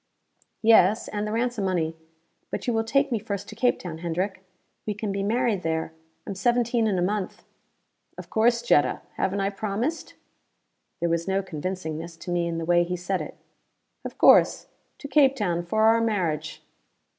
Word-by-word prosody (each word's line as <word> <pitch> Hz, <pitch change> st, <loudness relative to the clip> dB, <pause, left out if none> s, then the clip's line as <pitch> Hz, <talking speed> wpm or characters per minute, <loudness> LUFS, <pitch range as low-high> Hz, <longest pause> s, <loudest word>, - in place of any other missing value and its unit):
"Yes. 220 Hz, -1 st, +5 dB
And 210 Hz, 0 st, -3 dB
the -, -, -3 dB
ransom 230 Hz, -2 st, -1 dB
money. 165 Hz, -4 st, -1 dB, 0.5 s
But -, -, -4 dB
you 245 Hz, -, 0 dB
will 225 Hz, 0 st, +1 dB
take 275 Hz, +5 st, +1 dB
me 230 Hz, -, +1 dB
first 200 Hz, -2 st, -5 dB
to -, -, -9 dB
Cape 245 Hz, -1 st, +2 dB
Town, 165 Hz, -3 st, -7 dB
Hendrick? 185 Hz, +3 st, -3 dB, 0.4 s
We 210 Hz, -, -1 dB
can 210 Hz, 0 st, -3 dB
be 195 Hz, 0 st, -2 dB
married 220 Hz, -1 st, 0 dB
there: 160 Hz, -1 st, -2 dB, 0.3 s
I -, -, -5 dB
am -, -, -2 dB
seventeen 235 Hz, +2 st, +1 dB
in 200 Hz, -3 st, 0 dB
a 175 Hz, -, +1 dB
month." 200 Hz, 0 st, -3 dB, 0.7 s
"Of -, -, -8 dB
course, 235 Hz, +2 st, +2 dB
Jetta. 150 Hz, -11 st, +2 dB, 0.2 s
Haven't 195 Hz, +1 st, 0 dB
I 195 Hz, +1 st, 0 dB
promised?" 220 Hz, +10 st, -3 dB, 0.9 s
There 170 Hz, -, +1 dB
was 170 Hz, +1 st, -1 dB
no 195 Hz, 0 st, 0 dB
convincingness 165 Hz, -1 st, -5 dB
to 175 Hz, -, -5 dB
me 175 Hz, -1 st, 0 dB
in 165 Hz, -1 st, -3 dB
the 165 Hz, -, -3 dB
way 175 Hz, +1 st, +4 dB
he 180 Hz, +1 st, -3 dB
said 180 Hz, +2 st, -2 dB
it. -, -, -8 dB, 0.7 s
"Of -, -, -7 dB
course. -, -, +5 dB, 0.3 s
To 285 Hz, -, -8 dB
Cape 275 Hz, -1 st, +4 dB
Town 175 Hz, -7 st, -1 dB
for 215 Hz, +5 st, 0 dB
our 225 Hz, +1 st, +5 dB
marriage." 185 Hz, -9 st, -2 dB
195 Hz, 180 wpm, -25 LUFS, 175-225 Hz, 0.9 s, Yes